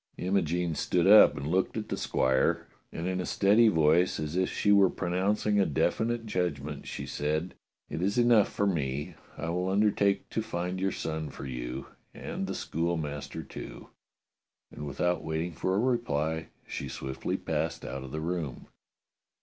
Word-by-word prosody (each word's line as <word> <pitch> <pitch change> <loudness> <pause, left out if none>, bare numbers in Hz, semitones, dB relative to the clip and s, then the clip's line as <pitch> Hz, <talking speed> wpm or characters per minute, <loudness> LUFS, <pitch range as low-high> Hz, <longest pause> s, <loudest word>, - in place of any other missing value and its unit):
Imogene 90 -2 0
stood 85 +2 +1
up 105 -3 +8
and 70 - -4
looked 95 +8 0
at 110 - -4
the - - -1
squire, 65 0 +1 0.3
and 85 - -5
in 95 0 -1
a - - -3
steady 105 +4 +4
voice, 80 -1 +3
as 75 +1 -3
if 95 0 +1
she 105 - +2
were 100 -2 +6
pronouncing 100 +4 0
a 100 - +4
definite 115 - 0
judg 90 -8 -1
ment, 70 +1 -7
she - - -5
said: 75 +4 -2 0.3
"It - - -4
is 100 +4 0
enough 120 -4 +5
for 100 - 0
me. 75 -2 -1 0.2
I 85 - -3
will 90 +2 -1
undertake 100 0 +2
to 110 - 0
find 90 -3 -3
your 95 0 +1
son 80 -2 -3
for 70 - -8
you, 60 0 -5 0.3
and - - -4
the - - -3
schoolmaster, 80 -3 -3
too." - - -9 0.8
And 75 - -7
without 90 +5 0
waiting 80 +2 -2
for 95 +4 -1
a - - +2
reply 80 - 0 0.2
she - - -5
swiftly 65 0 -3
passed - - -2
out 65 0 -5
of 65 - -8
the 75 - -3
room. 80 -5 -4
90 Hz, 170 wpm, -29 LUFS, 75-100 Hz, 0.8 s, up